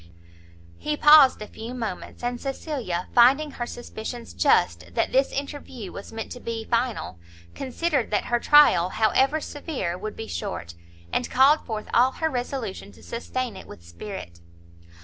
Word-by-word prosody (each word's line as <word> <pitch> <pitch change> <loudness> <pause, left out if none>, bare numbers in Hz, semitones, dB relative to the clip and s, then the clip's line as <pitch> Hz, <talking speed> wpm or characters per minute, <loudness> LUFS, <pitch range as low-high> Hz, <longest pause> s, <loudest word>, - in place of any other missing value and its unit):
He 300 0 -2
paused 295 -7 +7
a - - -9
few 230 +4 -8
moments; 225 -2 -6
and 245 0 -2
Cecilia 260 - -3
finding 270 +5 +5
her 240 -2 -5
suspicions 240 0 -7
just 85 - +2
that - - +1
this 265 +1 +2
interview 275 -7 -6
was 200 - -9
meant 225 0 -6
to 245 - -7
be 230 -2 -5
final, 230 - -1 0.3
considered 275 0 -1
that 210 - 0
her 240 0 +1
trial, 265 - +6
however 265 +9 +2
severe, 275 - -4
would 215 +2 -5
be 225 - -6
short, 190 - -5 0.4
and 250 - 0
called 275 +4 +5
forth 215 -3 -4
all 255 +3 +4
her 320 -1 -1
resolution 245 -6 -4
to - - -18
sustain 240 -1 -4
it 190 - -11
with 85 - -13
spirit. 85 - -8
240 Hz, 155 wpm, -25 LUFS, 210-270 Hz, 0.4 s, paused